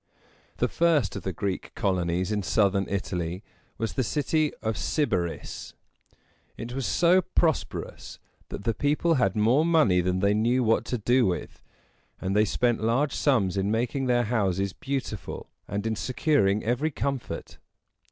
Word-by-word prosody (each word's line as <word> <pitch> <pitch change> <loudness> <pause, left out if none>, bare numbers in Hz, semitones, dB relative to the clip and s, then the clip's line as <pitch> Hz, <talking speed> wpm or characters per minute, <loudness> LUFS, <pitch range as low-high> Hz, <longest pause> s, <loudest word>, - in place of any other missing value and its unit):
The - - +2
first 155 - +2
of - - -4
the 95 - -3
Greek 95 +1 -4
colonies 90 -1 0
in 105 -1 0
southern 100 0 +2
Italy 90 -1 -3 0.3
was 115 -1 -2
the 130 - 0
city 150 +6 0
of 110 - 0
Syb´a 105 - 0
ris. 85 - -7 0.8
It 120 +1 -6
was 135 -1 -2
so 180 +2 +4
prosperous 170 -3 -2 0.3
that - - -6
the 115 - +1
people 150 +5 +1
had 120 - +1
more 115 +8 +3
money 155 - +4
than 90 +1 0
they 100 +2 +3
knew 120 +4 +2
what 115 0 +2
to 125 - -2
do 120 +1 +3
with; 90 - -4 0.6
and 95 +1 -2
they 105 +1 +4
spent 120 +2 +1
large 125 +6 +1
sums 100 -10 +1
in 95 +1 0
making 125 +5 -1
their 120 -1 +3
houses 100 -4 0
beautiful 135 -6 -5 0.2
and 100 +2 -3
in 110 0 0
securing 110 -5 +1
every 125 +7 0
comfort. 140 -3 -4
110 Hz, 155 wpm, -26 LUFS, 100-135 Hz, 0.8 s, so